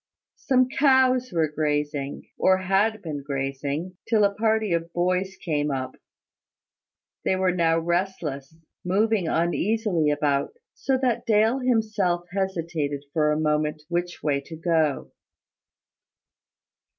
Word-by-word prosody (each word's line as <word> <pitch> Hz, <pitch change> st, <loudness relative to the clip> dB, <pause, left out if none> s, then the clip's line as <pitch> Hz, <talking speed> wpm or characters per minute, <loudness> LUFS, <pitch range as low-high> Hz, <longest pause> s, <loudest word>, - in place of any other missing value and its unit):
Some 255 Hz, -2 st, +2 dB
cows 260 Hz, -2 st, +3 dB
were 165 Hz, -3 st, +1 dB
grazing, 150 Hz, -2 st, -2 dB
or 190 Hz, 0 st, +3 dB
had 195 Hz, +3 st, +1 dB
been 150 Hz, -4 st, -4 dB
grazing, 140 Hz, +5 st, -3 dB
till 220 Hz, -2 st, +3 dB
a 200 Hz, 0 st, +3 dB
party 220 Hz, -2 st, +1 dB
of 170 Hz, 0 st, -2 dB
boys 185 Hz, +2 st, 0 dB
came 150 Hz, -5 st, -1 dB
up. 130 Hz, -2 st, -3 dB, 1.3 s
They 190 Hz, -, +1 dB
were 185 Hz, -1 st, +2 dB
now 165 Hz, -2 st, +2 dB
restless, 165 Hz, -4 st, -2 dB, 0.3 s
moving 200 Hz, 0 st, +1 dB
uneasily 175 Hz, 0 st, +1 dB
about, 145 Hz, -, 0 dB, 0.2 s
so 270 Hz, -1 st, 0 dB
that 245 Hz, -3 st, 0 dB
Dale 220 Hz, +4 st, +3 dB
himself 215 Hz, -8 st, +1 dB
hesitated 165 Hz, -7 st, -2 dB
for 150 Hz, -2 st, +2 dB
a 150 Hz, -, 0 dB
moment 150 Hz, 0 st, 0 dB
which 175 Hz, 0 st, -3 dB
way 140 Hz, -2 st, +1 dB
to 160 Hz, +4 st, -10 dB
go. 160 Hz, -3 st, 0 dB
175 Hz, 120 wpm, -25 LUFS, 150-210 Hz, 1.3 s, cows